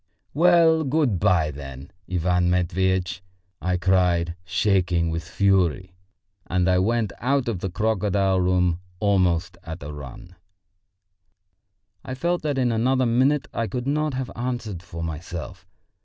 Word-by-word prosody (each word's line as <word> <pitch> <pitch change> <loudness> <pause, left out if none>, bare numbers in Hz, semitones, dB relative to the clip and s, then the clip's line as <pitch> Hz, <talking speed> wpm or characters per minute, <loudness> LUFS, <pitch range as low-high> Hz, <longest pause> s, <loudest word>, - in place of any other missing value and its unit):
"Well, 165 0 +5
good 135 - +1
bye, 85 -6 +2
then, 70 -1 -9 0.2
Ivan 90 0 +1
Matveitch!" 90 0 0 0.4
I 90 -1 0
cried, 90 -2 +2
shaking 90 -2 +1
with 80 +1 -3
fury, 95 -1 +1 0.5
and 90 0 +1
I 90 -1 +3
went 110 -1 0
out 135 0 +1
of 110 -6 -2
the 95 - -3
crocodile 100 -1 +1
room 90 -1 +2 0.2
almost 90 -3 +1
at 80 -3 -7
a 75 +1 -6
run. 75 +5 -10 1.7
I 130 - -5
felt 175 +6 -1
that 145 -3 -1
in 125 -2 +2
another 130 +3 +2
minute 130 +2 +2
I 115 - -1
could 125 0 -4
not 150 0 0
have 130 -1 -4
answered 120 -6 -4
for 85 -1 -7
myself. 80 -2 -6
95 Hz, 135 wpm, -24 LUFS, 85-120 Hz, 1.7 s, Well